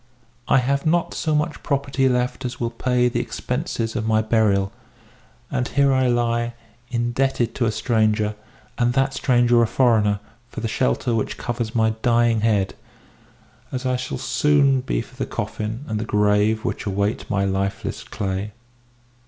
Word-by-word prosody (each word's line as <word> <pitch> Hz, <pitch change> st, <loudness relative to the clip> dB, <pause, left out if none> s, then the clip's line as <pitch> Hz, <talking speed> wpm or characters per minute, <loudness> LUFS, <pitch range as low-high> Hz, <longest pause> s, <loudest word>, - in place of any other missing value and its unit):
I -, -, +4 dB
have 140 Hz, +2 st, +1 dB
not 170 Hz, +2 st, +1 dB
so 155 Hz, -2 st, 0 dB
much 150 Hz, +1 st, -1 dB
property 135 Hz, -1 st, +1 dB
left 125 Hz, +1 st, -1 dB
as 125 Hz, 0 st, -4 dB
will 115 Hz, -1 st, -1 dB
pay 125 Hz, +1 st, +1 dB
the 120 Hz, -, -1 dB
expenses 115 Hz, -1 st, -3 dB
of 110 Hz, -, -2 dB
my 110 Hz, -1 st, +3 dB
burial; 105 Hz, -3 st, +2 dB, 0.8 s
and 125 Hz, -, 0 dB
here 140 Hz, -1 st, +3 dB
I 130 Hz, -1 st, +3 dB
lie, 120 Hz, -1 st, 0 dB, 0.3 s
indebted 120 Hz, +1 st, 0 dB
to 120 Hz, -, 0 dB
a -, -, +1 dB
stranger, 110 Hz, -2 st, +1 dB, 0.5 s
and 120 Hz, 0 st, +2 dB
that 135 Hz, +1 st, +1 dB
stranger 120 Hz, -2 st, +3 dB
a 115 Hz, -, +3 dB
foreigner, 110 Hz, -5 st, +3 dB, 0.3 s
for -, -, -7 dB
the 115 Hz, -, -2 dB
shelter 110 Hz, -, 0 dB
which 110 Hz, -, -1 dB
covers 120 Hz, -2 st, -3 dB
my 110 Hz, -1 st, +3 dB
dying 120 Hz, -2 st, +3 dB
head, 105 Hz, -3 st, +1 dB, 1.0 s
as 130 Hz, 0 st, -4 dB
I 130 Hz, 0 st, +1 dB
soon 135 Hz, +3 st, +2 dB
shall -, -, -1 dB
be -, -, -1 dB
for -, -, -13 dB
the -, -, -2 dB
coffin 110 Hz, +6 st, -4 dB
and 110 Hz, -1 st, -2 dB
the -, -, -2 dB
grave 105 Hz, +1 st, +2 dB
which -, -, -3 dB
await 100 Hz, +2 st, -1 dB
my 100 Hz, -1 st, +1 dB
lifeless 100 Hz, +1 st, -2 dB
clay." 100 Hz, +1 st, -4 dB
120 Hz, 160 wpm, -22 LUFS, 110-125 Hz, 1.0 s, I